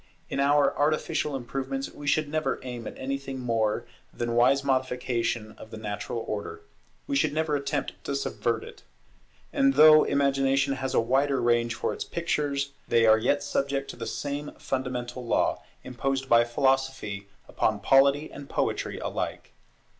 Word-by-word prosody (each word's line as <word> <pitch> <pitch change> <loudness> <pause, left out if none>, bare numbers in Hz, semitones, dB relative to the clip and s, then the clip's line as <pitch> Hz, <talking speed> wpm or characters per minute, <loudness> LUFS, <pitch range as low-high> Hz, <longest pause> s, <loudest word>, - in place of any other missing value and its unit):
In - - -2
our 140 0 +3
artificial 150 0 0
improvements 135 - -4
we 145 - -9
should 150 +2 +2
never 155 +1 -1
aim 120 -3 -6
at - - -8
anything 135 0 -4
more 115 -4 0 0.3
than 120 0 -3
wise 130 +4 +4
modification 125 -4 -1
of 110 - -11
the 110 - -8
natural 110 +2 -4
order; 435 -1 -5 0.4
we 280 - -2
should 275 - +2
never 155 -1 0
attempt 140 -1 -3
to 140 - -2
subvert 120 -4 -1
it. - - -12 0.7
And 135 0 +3
though 155 +1 +8
Imagination 135 0 +2
has 130 -1 -3
a - - +5
wider 135 +4 +2
range 120 -1 +2
for - - -2
its - - -4
pictures, 145 -4 -1 0.2
they 115 -1 +4
are 110 0 +6
yet 145 +6 +1
subject 140 -1 -1
to - - -12
the 115 - -6
same 145 +1 -4
fundamental 125 -1 -3
law, 115 - +1 0.2
imposed 135 +2 -2
by 120 -2 +5
Philosophy 130 -5 0 0.2
upon 110 -1 0
Polity 140 +6 +4
and 140 -1 -10
Poetry - - -1
alike. - - -4
135 Hz, 155 wpm, -27 LUFS, 120-140 Hz, 0.7 s, though